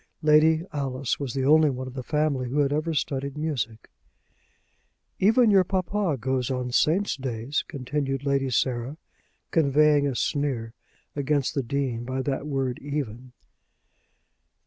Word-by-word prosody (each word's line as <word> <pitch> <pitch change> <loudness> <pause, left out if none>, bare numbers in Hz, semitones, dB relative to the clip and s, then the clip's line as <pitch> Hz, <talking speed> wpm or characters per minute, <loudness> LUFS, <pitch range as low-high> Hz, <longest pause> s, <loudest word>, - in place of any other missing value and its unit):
Lady 155 +1 +5
Alice 135 -2 -2
was 140 -3 -4
the 135 -1 0
only 155 +1 +5
one 130 -1 -4
of 130 - -8
the 130 - -5
family 140 -2 0
who 135 - -2
had 140 0 +1
ever 155 +3 -1
studied 140 -2 -2
music. 125 -8 -3 1.3
"Even 225 +3 +5
your 195 -2 +6
papa 185 -3 -1
goes 130 0 -1
on 125 -1 -2
Saints' 175 +11 +2
days," 130 +1 -3
continued 135 -1 -3
Lady 140 -1 +1
Sarah, 125 +3 -1 0.5
conveying 150 -1 +4
a 135 - -2
sneer 125 -5 -1 0.4
against 145 -1 0
the 140 - 0
Dean 125 -2 -2
by 130 +2 -3
that 140 +1 -2
word 135 -3 -2
"even." 130 -4 -5
140 Hz, 140 wpm, -26 LUFS, 130-150 Hz, 1.3 s, your